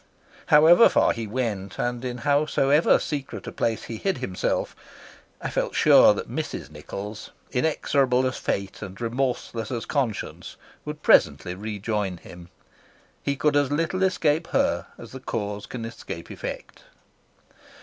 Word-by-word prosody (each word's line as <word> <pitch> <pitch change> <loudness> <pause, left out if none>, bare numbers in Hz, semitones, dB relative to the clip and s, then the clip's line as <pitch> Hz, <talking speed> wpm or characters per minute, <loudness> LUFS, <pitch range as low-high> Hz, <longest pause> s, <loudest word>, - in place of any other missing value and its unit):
However 160 +8 +7
far - - +3
he 115 -2 -5
went 105 -4 -3
and 120 0 -2
in 125 -1 -3
howsoever 145 +1 +3
secret 145 -3 -5
a - - -5
place 115 -1 -1
he 115 - -6
hid 195 - -1
himself, 90 -1 -2 0.6
I - - -4
felt - - -1
sure - - +7
that - - -5
Mrs. 70 - -5
Nichols, 100 +8 -7 0.2
inexorable 130 -2 +1
as 130 - -1
fate 100 -1 -3
and 95 -2 -8
remorseless 120 -2 -2
as 120 -3 -3
conscience, 130 -8 -3 0.3
would - - -7
presently 75 +4 +4
rejoin 105 -1 -3
him. 85 0 -13 0.7
He 140 - -1
could 150 +1 +1
as 145 -1 +2
little 165 +5 0
escape 165 -4 +1
her 280 +1 +1
as 115 - -11
the 130 - -8
cause 105 -4 -4
can 115 -2 -6
escape 115 - -8
the - - -7
effect. - - -7
125 Hz, 145 wpm, -25 LUFS, 105-145 Hz, 0.7 s, However